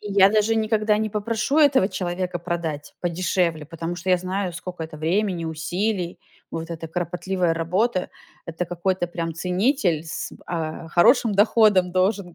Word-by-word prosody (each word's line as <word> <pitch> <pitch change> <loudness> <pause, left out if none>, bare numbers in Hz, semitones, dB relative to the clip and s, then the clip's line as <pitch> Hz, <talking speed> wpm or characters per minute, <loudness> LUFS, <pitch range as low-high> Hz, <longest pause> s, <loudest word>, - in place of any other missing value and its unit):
И 205 -1 -6
я 195 0 +6
даже 215 +1 +2
никогда 215 -1 +2
не 215 0 -1
попрошу 225 +7 0
этого 275 -10 +5
человека 180 -2 -3
продать 165 -4 -4
подешевле, 170 -3 0
потому 165 +1 -5
что 180 +2 -6
я 180 - +5
знаю, 185 0 -3
сколько 180 -1 -6
это 160 -1 -7
времени, 175 +2 0
усилий, 175 +4 -2 0.3
вот 165 +1 -5
эта 165 -1 -6
кропотливая 175 +1 -1
работа. 185 +5 0 0.4
Это 165 +2 -3
какой-то 175 +1 -1
прям 165 -1 -4
ценитель 180 - +1
с, 160 - -5
а, 165 -1 -4
хорошим 225 - +4
доходом 205 -3 +4
должен 185 -1 0
180 Hz, 150 wpm, -23 LUFS, 170-205 Hz, 0.4 s, я